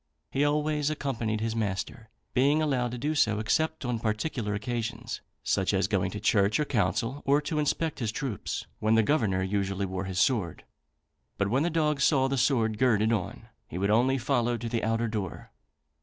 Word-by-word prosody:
He 140 - +1
always 150 0 +1
accompanied 115 -8 -2
his 115 0 -1
master, 110 +2 -3 0.2
being 140 +4 +3
allowed 135 -6 +1
to 125 - -5
do 150 +6 -1
so, 110 -8 +2
except 160 +8 0
on 120 -2 -1
particular 110 0 -2
occasions, 115 +1 -4 0.2
such 95 +1 +1
as 95 -1 +2
going 100 -2 0
to 105 - -5
church 105 +1 +2
or 150 - +1
council, 115 +4 0
or 140 +1 +4
to 150 +1 -2
inspect 155 +1 0
his 115 -4 -1
troops, 115 -4 -4
when 110 +1 +3
the 115 - +5
Governor 105 -9 +1
usually 100 0 -1
wore 95 0 -4
his 95 -1 -5
sword; 95 - +1 0.7
but 100 - 0
when 130 +3 +2
the 170 - +1
dog 150 -3 +1
saw 135 -2 +4
the 135 - -1
sword 115 -5 +2
girded 115 -3 +3
on, 90 -6 -4 0.2
he 85 - -6
would 100 +2 +1
only 125 +5 +3
follow 120 -1 0
to 115 +1 -5
the 115 0 -2
outer 115 +1 +1
door. 105 -8 -5
115 Hz, 185 wpm, -28 LUFS, 105-140 Hz, 0.7 s, the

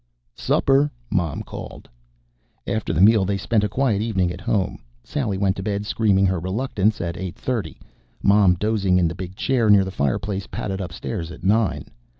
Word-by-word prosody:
"Supper!" 135 - +2 0.2
Mom 90 -7 -1
called. - - -9 0.8
After 110 -5 -2
the 85 +1 +1
meal, 105 0 +6
they 100 +1 0
spent 105 +1 +1
a 105 - 0
quiet 120 -6 +1
evening 95 -6 0
at 90 +1 -8
home. 95 0 -1 0.2
Sally 115 -10 -2
went 95 -1 +1
to - - -3
bed, 100 +1 -2
screaming 100 -3 +2
her 95 -1 +1
reluctance, 105 +3 -1
at 85 0 -3
eight 95 -2 -5
thirty. 110 -11 -3 0.4
Mom, 100 -3 +5
dozing 100 -2 +1
in 90 -2 +3
the 80 - -3
big 95 +1 -7
chair 120 0 +1
near 100 -2 +6
the 95 - -5
fireplace, 95 +5 -2
padded 95 -1 -4
upstairs 85 0 -5
at 90 - -12
nine. 105 +2 +1
100 Hz, 175 wpm, -22 LUFS, 90-110 Hz, 0.8 s, meal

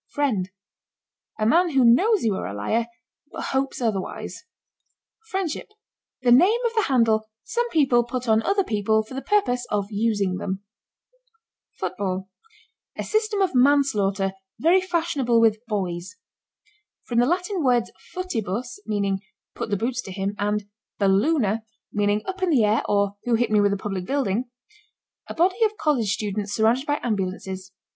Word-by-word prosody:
FRIEND. 225 -11 -1 0.9
A 215 - 0
man 340 +10 +4
who 270 -5 +3
knows 390 - +4
you 220 -3 +2
are 190 - -3
a 100 - -6
liar, 225 - 0 0.4
but - - -6
hopes 270 0 -1
otherwise. 225 - -3 0.8
FRIENDSHIP. 380 -6 -3 0.6
The 245 - +4
name 370 - +6
of 465 - 0
the 445 - +3
handle 225 -4 +2
some 480 0 -1
people 270 - +3
put 250 +1 -5
on 220 0 +4
other 395 - +1
people 220 - +1
for 220 - -12
the 270 - -4
purpose 250 -13 +1
of 205 0 -1
using 205 -3 0
them. 190 +1 -4 1.2
FOOTBALL. 185 0 -3 0.7
A - - -2
system 430 -1 0
of 380 -5 +1
manslaughter 245 -8 +3 0.3
very 335 +9 +4
fashionable 320 -10 +1
with 220 -1 +3
boys. 185 -3 -3 0.9
From 235 -1 0
the 245 - +4
Latin 360 +2 0
words 245 -3 +2 0.2
"footibus," 245 - -3
meaning 200 -2 0 0.3
"put - - -5
the 205 - +1
boots 240 +4 -1
to 190 - -9
him," 195 +1 -2
and 205 0 -1 0.3
"balloona," 215 +3 +2 0.3
meaning 205 0 +1
"up 380 0 -5
in 370 - +2
the 270 -9 +4
air, 210 +1 +2
or, 200 0 +1
who 240 -1 +2
hit 240 0 0
me 210 -1 +4
with 205 0 +3
a 200 - 0
public 195 -2 -4
building?" 245 -2 -1 0.8
A - - -7
body 370 +6 +2
of 430 -1 +1
college 250 -10 +1
students 205 0 -2
surrounded 230 +5 +2
by 290 0 +1
ambulances. 190 -3 -3
230 Hz, 155 wpm, -24 LUFS, 205-290 Hz, 1.2 s, name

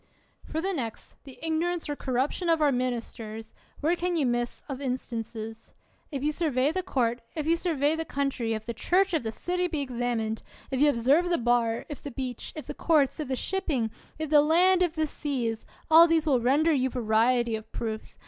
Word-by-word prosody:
For 320 - -3
the 385 +2 -1
next, 235 -9 -5
the 270 -2 -11
ignorance 330 +2 -1
or 290 - -2
corruption 270 +7 -1
of 330 -1 +4
our 295 -2 +4
ministers, 230 -3 -4 0.3
where 320 +4 +2
can 355 0 -1
you 305 -4 +2
miss 240 -1 -1
of 275 -2 -5
instances? 225 -3 -5 0.4
If 275 -2 -3
you 300 - +2
survey 290 -4 +1
the 370 +3 -1
court, 245 -8 0
if 310 -2 -2
you 330 +1 +3
survey 315 -3 +1
the 325 - -2
coun 280 -3 -1
try, 235 -3 -4
if 220 -1 -2
the 235 - -3
church, 370 - +2
if 320 - +2
the 220 -2 -3
city 360 +8 -1
be 320 -4 -2
examined; 240 -4 -2 0.3
if 265 0 0
you 295 - +6
observe 285 +8 +3
the 345 - +2
bar, 235 -1 +1
if 295 -3 -7
the 285 - -6
bench; 255 -2 -5
if 305 - -6
the - - -5
courts, 305 -3 +2
if 305 - -3
the 260 - -1
shipping; 280 - -1 0.3
if 315 -1 -4
ths 300 - +7
land, 350 +5 +5
if 350 -3 +2
the 315 -1 +1
seas 250 -7 -3
— - - -26
all 330 +2 +9
these 325 -1 +2
will 275 -5 +3
render 295 +7 +3
you 260 -2 +1
variety 235 0 +2
of 220 0 -8
proofs. 220 -1 -5
275 Hz, 210 wpm, -27 LUFS, 240-320 Hz, 0.4 s, all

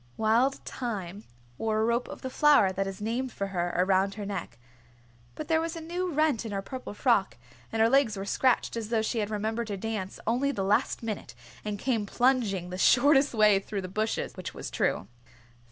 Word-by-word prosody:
Wild 235 +5 +3
Thyme 205 -5 -5 0.3
wore 220 -1 0
a 220 - +2
rope 235 +1 0
of - - -9
the 260 - -4
flower 290 -10 +5
that 195 +1 -2
is 195 +1 -6
named 245 +4 -2
for 200 - -3
her 175 -2 -1
around 190 +2 +2
her 210 -2 -5
neck, 195 - -5 0.8
but 305 - -6
there 320 0 +2
was 330 +1 -3
a - - -5
new 350 +3 -3
rent 305 -6 +1
in 225 - -6
her 195 -1 -3
purple 255 -2 -7
frock 225 -5 +2 0.3
and 225 0 +2
her - - +6
legs 245 -4 +3
were 195 - -4
scratched 250 +5 +1
as 225 -2 -4
though 225 -2 +1
she 225 +1 -1
had 210 -1 -1
remembered 220 +2 -2
her 200 - -3
dance 205 -2 -4
only 250 +5 +1
the 200 -8 -2
last 200 +4 +1
minute 220 -2 -5 0.3
and 210 -1 -3
come 225 -2 -1
plunging 220 -8 +1
the 185 - -5
shortest 275 +4 +5
way 210 -2 +5
through 200 0 -5
bushes, 215 +4 -2
which - - -7
was - - -6
true. 95 - 0
220 Hz, 200 wpm, -28 LUFS, 200-255 Hz, 0.8 s, her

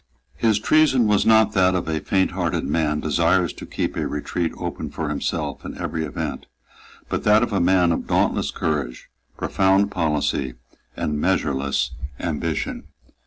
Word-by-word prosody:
His 110 -3 +2
treason 135 +1 +3
was 105 0 +2
not 110 -1 +5
that 95 -1 +3
of 90 - -2
a 80 -1 -1
fainthearted 90 0 0
man 75 0 0
desirous 85 +3 +2
to - - -10
keep - - -3
a - - -1
retreat 80 +3 -2
open - - -4
for - - -4
himself 75 -4 -3
in - - -7
every 80 - -3
event, 75 - -5 0.6
but - - -2
that 105 +2 +5
of 120 - -2
a 100 - +2
man 90 -1 +3
of 80 - -2
dauntless - - +1
courage, 70 -6 -3 0.3
profound 95 +1 +2
policy 75 -7 -1 0.4
and 75 -1 -2
measureless 70 -7 0 0.3
ambition. 80 -1 -3
85 Hz, 150 wpm, -22 LUFS, 75-95 Hz, 0.6 s, not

